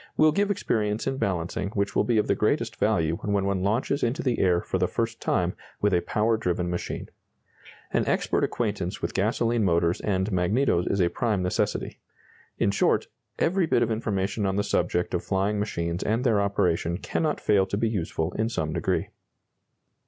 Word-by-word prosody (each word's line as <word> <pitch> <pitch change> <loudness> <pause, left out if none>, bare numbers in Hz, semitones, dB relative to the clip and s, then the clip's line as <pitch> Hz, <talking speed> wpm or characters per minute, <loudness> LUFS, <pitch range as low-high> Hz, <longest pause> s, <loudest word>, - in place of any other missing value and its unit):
will 155 0 +6
give 200 +5 +1
experience 110 - 0
in 135 0 -1
balancing 90 -2 -2
which 100 -1 -1
will - - +4
be 120 -2 +1
of 105 - +3
the - - +2
greatest - - 0
value 80 +1 +1
when 100 -2 -1
one 100 -1 0
launches 115 +8 0
into 125 +8 0
the 125 -4 0
air 90 -2 +3
for - - -2
the - - +2
first - - -3
time - - +1 0.3
with 105 -1 +2
a 90 - +3
power 110 +4 +1
driven 90 -3 -1
machine. 90 - -4 0.9
An - - +1
expert - - +1
acquaintance 100 -6 -2
with - - -2
gasoline 115 +3 +1
motors 85 -2 +2
and 95 0 0
magnetos 90 +1 +1
is 100 - +1
a 85 - +3
prime 105 -3 0
necessity. 90 - -1 0.6
In 100 - +2
short, 100 - +1 0.3
every 175 0 +2
bit 120 - +3
of 115 - -1
information 105 -2 -1
on 95 - 0
the 100 - +1
subject 90 -3 0
of 90 - -1
flying 100 +2 0
machines 85 -4 -2
and 115 +4 0
their 110 -6 +3
operation 85 -4 +1
cannot 155 - -1
fail 100 -2 +3
to 100 - -2
be 115 - +1
useful 85 -5 -2
in 110 +4 -1
some 80 -9 -2
degree. 85 - -1
100 Hz, 185 wpm, -26 LUFS, 90-115 Hz, 0.9 s, will